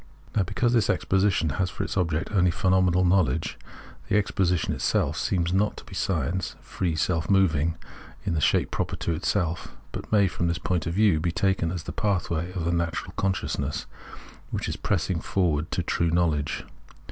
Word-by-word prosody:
Now 105 - +4
because 120 +6 +1
this 115 -5 +3
exposition 95 -5 +2
has 95 - +1
for - - -4
its - - -4
object 85 -3 0
only 90 -4 +3
phenomenal 90 0 +3
knowledge, 80 -5 +1 0.5
the 105 - +3
exposition 90 -4 +1
itself - - 0
seems 85 -2 0
not 105 +2 +1
to - - -9
be - - -12
science, 90 +1 -1
free, 85 -4 -2
self 85 +1 0
moving 85 -5 +3 0.5
in - - 0
the 80 - 0
shape - - +2
proper 90 0 -2
to 85 - -2
itself, 85 +1 -1
but - - -7
may, 100 -2 +5
from 85 -1 -1
this 85 -1 0
point 90 -2 -1
of 85 - -2
view, 100 -6 +4
be 85 +2 0
taken 95 -2 +1
as 85 -2 -4
the - - -5
pathway 90 -5 -1
of 90 -4 -3
the 85 - +1
natural 85 -1 -2
consciousness 75 -6 -2 0.6
which - - -3
is - - -2
pressing 90 -3 -1
forward 80 -6 0
to - - -1
true 85 - +1
knowledge. 80 -4 0
90 Hz, 180 wpm, -26 LUFS, 80-95 Hz, 0.6 s, may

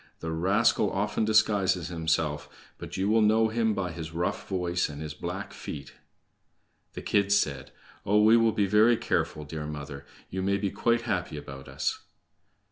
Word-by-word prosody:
The 80 - -4
rascal 100 +5 +2
often 105 +2 0
disguises 100 -5 +2
himself, 80 -3 -1 0.3
but - - -7
you 95 +1 0
will 110 +1 +4
know 110 +1 +4
him 110 -1 +1
by 90 -3 -2
his 80 -1 -7
rough 85 +2 -2
voice 90 -3 0
and 75 -1 -8
his 75 -1 -5
black 75 - -6
feet." 70 -2 -8 1.0
The - - -7
kids 100 0 +3
said: 70 -7 -2 0.3
"Oh, 105 +2 +3
we 110 +2 +7
will 115 -1 +4
be 105 -2 +1
very 110 +4 +4
careful, 75 - -1
dear 75 0 -6
mother. 70 -2 -7 0.2
You 95 - -3
may 100 +1 +1
be 100 -1 -2
quite 115 0 +1
happy 90 -9 -2
about 70 -2 -9
us." - - -2
95 Hz, 170 wpm, -28 LUFS, 80-105 Hz, 1.0 s, we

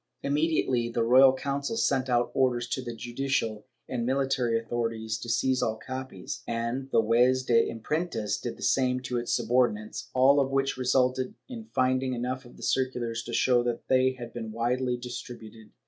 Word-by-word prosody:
Immediately 140 -5 +1
the 115 0 0
Royal 130 +3 +7
Council 140 +8 -3
sent 135 - +1
out 120 -1 +2
orders 125 -2 +1
to 130 - -2
the 120 -2 -6
judicial 120 -2 -2 0.2
and 120 -2 -2
military 130 -2 +1
authorities 115 -1 -3
to 120 - -7
seize 130 +2 +1
all 110 -2 0
copies, 120 -3 -7
and 120 +4 -2
the 115 - +4
Juez 125 +4 +3
de 115 -2 +3
Imprentas 115 -2 -2
did - - -5
the - - -9
same 130 -1 +2
to 125 -1 -3
his 120 0 -2
subordinates, 120 -3 0
all 135 +3 +5
of 135 -1 +1
which 135 0 0
resulted 130 0 +1
in 235 -4 -8
finding 130 0 +1
enough 125 +2 -3
of 120 - -15
the - - -11
circulars 125 -3 -1
to 120 - -8
show 125 0 +3
that 120 -1 -3
they 130 0 +4
had 120 -2 -9
been 115 -2 -5
widely 125 +2 0
distributed. 115 -3 -9
125 Hz, 175 wpm, -28 LUFS, 115-130 Hz, 0.2 s, Royal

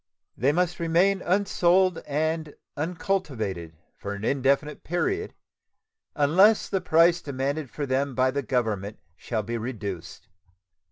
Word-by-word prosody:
They 135 +4 +2
must 175 +2 0
remain 175 +4 +2
unsold 185 -1 +2
and 155 +1 -1 0.2
uncultivated 135 - -3 0.2
for 100 - -6
an 100 +2 -6
indefinite 140 +3 0
period 390 - -2 0.8
unless 185 +9 +4
the 190 -2 0
price 165 +1 +4
demanded 140 0 -3
for 145 - -4
them 135 0 -1
by 130 +1 +3
the 140 +1 -1
Government 110 -6 -2 0.2
shall 110 +3 -3
be 115 +2 -3
reduced. 105 -4 -6
145 Hz, 120 wpm, -26 LUFS, 120-175 Hz, 0.8 s, unless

